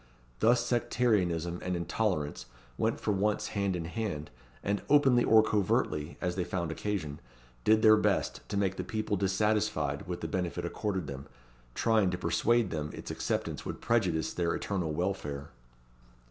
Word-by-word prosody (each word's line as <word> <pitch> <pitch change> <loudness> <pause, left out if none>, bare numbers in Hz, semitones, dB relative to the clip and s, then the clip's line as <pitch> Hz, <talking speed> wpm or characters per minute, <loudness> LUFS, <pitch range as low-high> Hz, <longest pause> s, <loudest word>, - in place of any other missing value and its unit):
Thus 120 +1 +4
sectarianism 90 -9 +1
and 90 0 -2
intolerance 85 - -1 0.3
went - - 0
for 105 - 0
once 105 +1 0
hand 100 -2 0
in 85 -2 -3
hand, 90 -6 -4 0.3
and 100 0 0
openly 135 -4 +5
or 110 -1 +6
covertly, 85 -7 0
as 90 0 -2
they 95 - 0
found 85 -2 -2
occasion, 80 -6 -3 0.4
did 110 0 +4
their 110 -1 +8
best - - 0
to 100 - -2
make 95 -1 0
the - - -2
people 110 -2 -2
dissatisfied 100 +2 0
with - - -4
the - - -2
benefit 90 -2 -2
accorded 95 -4 -2
them, 70 0 -7 0.5
trying 110 -4 +3
to 90 - -2
persuade 120 +2 +2
them 75 -2 -3
its - - -7
acceptance - - -2
would - - -5
prejudice 90 - +1
their 85 -1 0
eternal 90 -6 -2
welfare. 75 -5 -3
95 Hz, 155 wpm, -30 LUFS, 85-110 Hz, 0.5 s, their